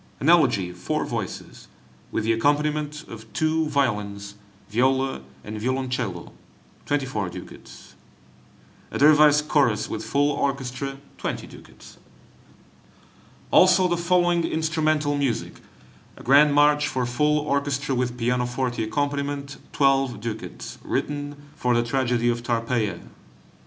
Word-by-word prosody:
An 145 - +1
Elegy, 120 - +4
four 90 0 -3
voices, - - -6 0.4
with - - -1
the 115 +1 +2
accompaniment 150 +4 0
of 110 -1 -11
two 160 0 +1
violins, 105 -8 -1 0.3
viola, 130 - +1 0.2
and 105 0 -6
violoncello, 125 -7 -2 0.6
24 135 -9 -1
ducats. - - -12 1.0
A - - -4
Dervise 150 0 +6
Chorus, 140 -8 +1
with - - -4
full 145 +1 +1
orchestra, 135 -1 -3 0.2
20 - - -3
ducats. - - -15 1.5
Also 185 0 +6
the 175 - +1
following 175 0 +2
instrumental 155 -2 0
music: 140 -4 -2 0.6
a - - -12
Grand 145 +3 +5
March 145 0 +4
for 130 -1 -1
full 150 +5 +1
orchestra, 140 -1 -1
with 125 -1 -1
pianoforte 125 0 -1
accompaniment, 140 +2 -2
12 135 -4 +2
ducats, 110 0 -7
written 145 0 -3 0.2
for 125 -1 +1
the 120 - +2
tragedy 120 -1 0
of 120 0 0
"Tarpeia." 115 -5 -1
135 Hz, 115 wpm, -24 LUFS, 120-150 Hz, 1.5 s, Dervise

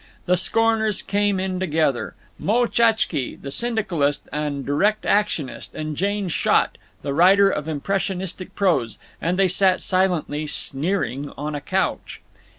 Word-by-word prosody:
The 180 - +3
scorners 220 +2 +2
came 205 -1 0
in 185 -1 -2
together—Moe 170 - -1
Tchatzsky, 225 - +1
the 140 - -7
syndicalist 185 - -1
and 145 -2 -3
direct 200 +10 +1
actionist, 200 -10 -1
and 155 -1 -4
Jane 200 +3 -1
Schott, 170 - +1 0.2
the 140 0 -2
writer 195 +5 +5
of 150 -3 -3
impressionistic 185 +3 -3
prose—and 170 - -1
they 195 -1 +4
sat 185 0 +3
silently 175 -5 0
sneering 145 -1 -1
on 150 +2 -4
a 145 - -4
couch. 190 +6 -2
185 Hz, 125 wpm, -22 LUFS, 150-200 Hz, 0.2 s, writer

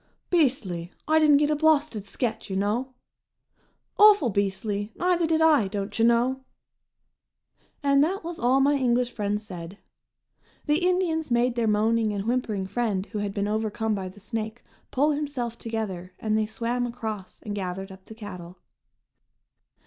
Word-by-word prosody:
"Beastly! 240 - +1 0.2
I 315 +1 +4
didn't 300 -2 +6
get 295 +1 +2
a - - +2
blawsted 300 -8 +2
sketch, 220 +1 -3
you 190 - -3
know." 230 +7 -1 1.0
"Awful 410 - +7
beastly! 200 +1 -1
Neither 350 -2 +1
did 320 0 +2
I, 300 -10 +5
don't 200 +2 -4
you - - +4
know." 240 +3 +3 1.4
And 280 0 +4
that 375 +5 -1
was 335 0 -6
all 250 +3 +3
my 285 +2 +4
English 250 -3 +1
friends 210 -1 -2
said. 180 -1 -8 0.9
The 300 +3 +1
Indians 355 -4 +1
made 240 +1 +2
their 235 -2 0
moaning 220 +1 +2
and 200 -1 -2
whimpering 225 -5 -1
friend 200 -1 -1
who 215 - -3
had 205 -1 -2
been 200 0 0
overcome 220 +1 -1
by 190 -2 -3
the 190 - -15
snake 220 +2 -5 0.3
pull 290 +4 +2
himself 285 -6 -3
together 195 -6 -4
and 215 -1 -1
they 215 0 +1
swam 240 +2 -2
across 220 -5 -6
and 210 - -4
gathered 190 0 -4
up 190 0 -13
the 220 - -11
"cattle." 180 -5 -9
230 Hz, 155 wpm, -26 LUFS, 205-280 Hz, 1.4 s, Awful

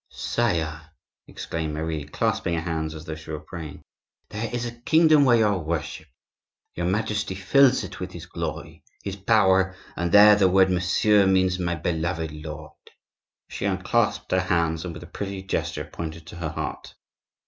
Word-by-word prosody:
"Sire," 85 -9 -1 0.5
exclaimed 80 -2 -4
Marie, 80 -1 -3
clasping 85 +3 -1
her 80 - -1
hands 80 -2 -3
as 80 0 -9
though 80 - -5
she 80 0 -11
were 75 -1 -4
praying, 80 0 -9 0.5
"there 105 +2 -4
is 120 0 -2
a 120 - -4
kingdom 155 +1 +5
where 120 -2 +5
you 110 - +4
are 100 -3 +1
worshipped. 80 -1 -4 0.6
Your 85 0 -2
Majesty 105 0 -1
fills 130 +7 +4
it - - -8
with - - -5
his - - -8
glory, - - -6 0.2
his 100 -1 -4
power; 95 -2 +3 0.2
and 85 0 -2
there 105 +1 +8
the 100 -2 +4
word 95 0 +4
'monsieur,' 95 +3 +3
means 95 -1 +2
'my 85 -1 -1
beloved 80 0 -2
lord.'" 75 0 -8 0.8
She - - -5
unclasped - - 0
her 95 - +3
hands, 85 -3 0
and 85 -3 -6
with 85 - -9
a - - -9
pretty 95 +2 -6
gesture 80 -5 -3
pointed 80 +1 -7
to 85 - -10
her 85 -2 -3
heart. 75 -3 -6
85 Hz, 170 wpm, -25 LUFS, 80-100 Hz, 0.8 s, there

